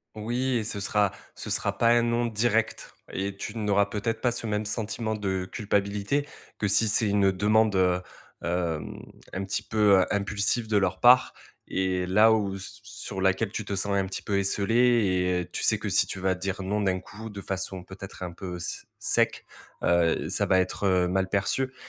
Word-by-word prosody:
Oui, 120 +4 -1
et 115 - -1
ce 105 -1 -3
sera 100 0 +1 0.2
ce - - -7
sera - - 0
pas 115 - +3
un 120 0 +5
non 120 0 +1
direct 115 0 0 0.2
et 100 +1 -3
tu 115 - -6
n'auras 100 -2 +2
peut-être 110 +2 -3
pas 120 - +2
ce 115 -1 -4
même 105 0 -1
sentiment 110 +1 -2
de 95 -3 -2
culpabilité 105 +6 -1 0.3
que 105 - -1
si 105 +3 +3
c'est 110 +1 +3
une 100 -1 +3
demande, 105 +2 +2
heu, 90 -1 +2 0.4
hem, 85 -3 -2 0.3
un 95 +1 -3
petit 95 - -2
peu, 105 -3 +4
heu, 90 - +3
impulsive 100 +3 0
de 105 -1 +2
leur 95 -3 0
part 125 +1 +6 0.4
et 95 -1 0
là, 105 +5 +5
où, 100 -3 +1
s 95 -1 -8
sur 95 - -7
laquelle 95 +2 +1
tu 110 - -4
te 100 - -3
sens 100 +1 0
un 95 -1 +1
petit 95 - -5
peu 100 -1 0
esseulée 100 +1 0 0.4
et 90 -1 +1
heu 85 - -13
tu - - -4
sais - - +3
que - - -4
si - - +2
tu 95 - -5
vas 95 0 +1
dire: 95 +1 -4
«non» 105 +2 -1
d'un 95 -2 +1
coup, 110 +2 -10
de 100 -1 -8
façon 95 -1 -4
peut-être 95 0 -9
un 90 - -4
peu 90 +1 -7
s 85 - -5
sec, - - +1 0.4
heu, 85 -2 +2
ça - - +2
va 95 - +3
être, 95 +2 -1
heu, 90 -1 +3
mal 95 +1 0
perçu 130 +7 0
100 Hz, 205 wpm, -27 LUFS, 95-110 Hz, 0.4 s, part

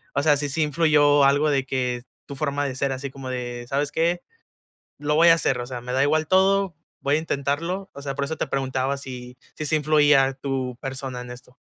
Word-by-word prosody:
o 140 - +1
sea, 150 -2 +4
si 145 0 -1
sí 160 +4 0
influyó 150 -2 +4
algo 145 +2 +3
de 135 -2 +1
que 125 -2 -2 0.2
tu 140 - -7
forma 145 -1 -1
de 130 -2 -3
ser 135 +1 -1
así 135 +1 -5
como 135 -1 -8
de: 120 -1 -5
"¿Sabes 140 +1 -1
qué?, 170 +2 0 0.8
lo 150 +1 -1
voy 165 +2 +6
a 165 - +8
hacer, 135 -6 0
o 120 - -5
sea, 125 -1 -6
me 125 +1 -5
da 130 +1 +2
igual 155 +2 +2
todo, 190 -1 +3 0.3
voy 140 +2 +2
a - - +1
intentarlo", 165 +6 -2
o 140 - -9
sea, 140 -1 -4
por 140 0 -2
eso 160 +2 -4
te - - -1
preguntaba 135 0 -1
si 125 -2 -8 0.2
si 155 - -4
sí 155 - +2
influía 150 -2 +4
tu 130 -2 -3
persona 135 -2 -5
en 125 - -10
esto. 125 0 -14
140 Hz, 225 wpm, -24 LUFS, 130-150 Hz, 0.8 s, a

